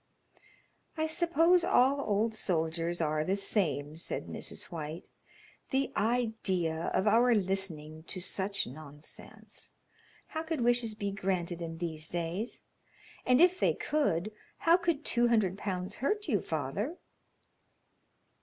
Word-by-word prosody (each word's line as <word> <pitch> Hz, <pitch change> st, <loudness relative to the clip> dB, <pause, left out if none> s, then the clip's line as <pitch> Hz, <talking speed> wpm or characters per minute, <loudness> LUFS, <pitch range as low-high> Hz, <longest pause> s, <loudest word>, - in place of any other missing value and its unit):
"I 315 Hz, -, +1 dB
suppose 335 Hz, +2 st, +3 dB
all 280 Hz, -5 st, +4 dB
old 215 Hz, 0 st, +1 dB
soldiers 170 Hz, -3 st, -1 dB
are 155 Hz, -1 st, +1 dB
the 190 Hz, +5 st, 0 dB
same," 155 Hz, -7 st, -1 dB
said 170 Hz, -, -3 dB
Mrs. -, -, -6 dB
White. 160 Hz, 0 st, -6 dB, 0.6 s
"The 270 Hz, 0 st, 0 dB
idea 205 Hz, -8 st, 0 dB
of 190 Hz, -, +2 dB
our 235 Hz, +3 st, +5 dB
listening 180 Hz, -6 st, 0 dB
to 185 Hz, -, -1 dB
such 195 Hz, +2 st, 0 dB
nonsense! 150 Hz, +2 st, -12 dB, 0.6 s
How 315 Hz, -, -3 dB
could 320 Hz, -4 st, -3 dB
wishes 240 Hz, -2 st, +2 dB
be 200 Hz, -2 st, -3 dB
granted 180 Hz, -3 st, -2 dB
in 165 Hz, -1 st, -5 dB
these 160 Hz, -2 st, -3 dB
days? 175 Hz, +7 st, -3 dB, 0.6 s
And 250 Hz, +1 st, +5 dB
if 360 Hz, +1 st, +5 dB
they -, -, +3 dB
could, 215 Hz, -, 0 dB, 0.3 s
how 335 Hz, +1 st, +5 dB
could 340 Hz, -4 st, 0 dB
two 240 Hz, 0 st, +3 dB
hundred 215 Hz, -6 st, +2 dB
pounds 185 Hz, -2 st, -4 dB
hurt 415 Hz, -, -1 dB
you, 205 Hz, -, +1 dB
father?" 165 Hz, -, -3 dB
200 Hz, 125 wpm, -31 LUFS, 165-250 Hz, 0.6 s, our